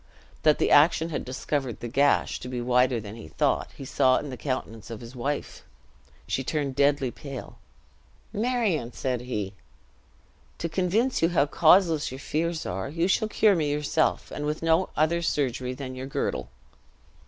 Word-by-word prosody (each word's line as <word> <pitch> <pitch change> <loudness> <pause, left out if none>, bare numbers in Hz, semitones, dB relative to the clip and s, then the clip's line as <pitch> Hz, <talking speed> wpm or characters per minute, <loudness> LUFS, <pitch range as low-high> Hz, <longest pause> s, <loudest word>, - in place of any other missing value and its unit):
That 155 -1 +4
the - - +1
action 160 +2 +5
had 155 - -3
discovered 130 -1 -3
the 120 - -5
gash 140 +4 +2
to - - -8
be 125 -1 -3
wider 125 0 +2
than 105 0 -8
he 115 - -10
thought, - - 0
he 135 - -7
saw 130 -1 +3
in 145 - -4
the - - -5
countenance 120 -5 -4
of 115 -2 -6
his 120 +2 -11
wife! 140 +4 -3 0.6
She 135 - -1
turned 140 -1 -2
deadly 140 -2 +2
pale. 135 -2 -9 0.7
"Marion," 210 - 0
said 125 -2 -2
he, 105 -6 -4 1.0
"to 170 - -2
convince 190 +9 +1
you 165 - +4
how 160 -5 +3
causeless 160 0 +4
your 130 - -6
fears 160 +4 -2
are, 95 +5 -3
you 165 +4 0
shall 215 +3 +2
cure 215 -1 +4
me 155 -4 0
yourself; 150 +2 0
and 145 - -4
with 150 +2 -3
no 165 +3 +3
other 165 +2 +2
surgery 130 -5 -1
than 130 -1 -6
your 130 +1 -6
girdle!" 135 - -2
140 Hz, 170 wpm, -26 LUFS, 125-165 Hz, 1.0 s, action